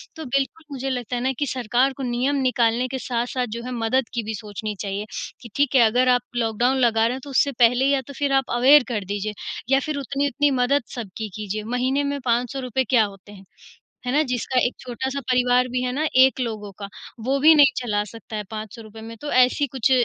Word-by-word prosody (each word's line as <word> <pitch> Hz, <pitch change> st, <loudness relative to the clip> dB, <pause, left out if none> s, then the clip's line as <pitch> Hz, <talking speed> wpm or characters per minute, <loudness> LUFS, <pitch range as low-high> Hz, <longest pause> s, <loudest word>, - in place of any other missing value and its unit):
तो 320 Hz, -1 st, -7 dB
बिल्कुल 275 Hz, +5 st, -2 dB
मुझे 270 Hz, -1 st, -4 dB
लगता 250 Hz, -2 st, -3 dB
है 240 Hz, -, -2 dB
ना 260 Hz, +1 st, +1 dB
कि 290 Hz, -, +1 dB
सरकार 255 Hz, +1 st, +1 dB
को 275 Hz, -, -5 dB
नियम 250 Hz, +3 st, 0 dB
निकालने 245 Hz, -1 st, +1 dB
के 260 Hz, +1 st, -4 dB
साथ-साथ 245 Hz, +1 st, -2 dB
जो -, -, -5 dB
है 250 Hz, -, -6 dB
मदद 235 Hz, +1 st, 0 dB
की 235 Hz, -1 st, -2 dB
भी 220 Hz, +1 st, -4 dB
सोचनी 210 Hz, 0 st, -6 dB
चाहिए, 200 Hz, 0 st, -3 dB, 0.4 s
कि 235 Hz, -, -10 dB
ठीक 280 Hz, -1 st, +1 dB
है, 260 Hz, -, +7 dB
अगर 250 Hz, +3 st, +3 dB
आप 245 Hz, -1 st, +4 dB
लॉकडाउन 240 Hz, +3 st, +1 dB
लगा 230 Hz, -3 st, +3 dB
रहे 235 Hz, -, +1 dB
हैं, 265 Hz, -, -8 dB
तो 285 Hz, -, -9 dB
उससे 280 Hz, +1 st, +2 dB
पहले 245 Hz, +2 st, +4 dB
या 275 Hz, -1 st, +2 dB
तो 280 Hz, -, -9 dB
फिर 285 Hz, -1 st, 0 dB
आप 270 Hz, -1 st, +1 dB
अवेयर 270 Hz, +4 st, +7 dB
कर 210 Hz, -5 st, -3 dB
दीजिए 205 Hz, +2 st, -3 dB, 0.4 s
या 270 Hz, 0 st, +4 dB
फिर 300 Hz, +1 st, -3 dB
उतनी-उतनी 280 Hz, +1 st, 0 dB
मदद 280 Hz, +3 st, +2 dB
सबकी 220 Hz, -2 st, -6 dB
कीजिए। 215 Hz, 0 st, -4 dB
महीने 250 Hz, +5 st, 0 dB
में 285 Hz, 0 st, -2 dB
₹500 250 Hz, +2 st, 0 dB
क्या 235 Hz, -4 st, +5 dB
होते 200 Hz, 0 st, -12 dB
हैं, 195 Hz, -1 st, -14 dB, 0.6 s
है 250 Hz, -, -1 dB
ना? 295 Hz, -, +4 dB
जिसका 250 Hz, -1 st, -1 dB
एक 245 Hz, -, -6 dB
छोटा-सा 260 Hz, +2 st, -4 dB
परिवार 250 Hz, 0 st, +3 dB
भी 250 Hz, 0 st, -1 dB
है 250 Hz, -, -1 dB
ना 295 Hz, +5 st, -1 dB, 0.2 s
एक 265 Hz, 0 st, +2 dB
लोगों 215 Hz, -4 st, -4 dB
का, 200 Hz, -, -5 dB, 0.3 s
वो 265 Hz, +5 st, 0 dB
भी 310 Hz, +3 st, +7 dB
नहीं 285 Hz, -3 st, +7 dB
चला 210 Hz, -4 st, 0 dB
सकता 225 Hz, -1 st, -9 dB
है 210 Hz, -, -3 dB
₹500 220 Hz, 0 st, -8 dB
में, 225 Hz, +1 st, -9 dB
तो 295 Hz, -, -5 dB
ऐसी 255 Hz, +3 st, +3 dB
कुछ 260 Hz, 0 st, +1 dB
250 Hz, 220 wpm, -23 LUFS, 225-270 Hz, 0.6 s, है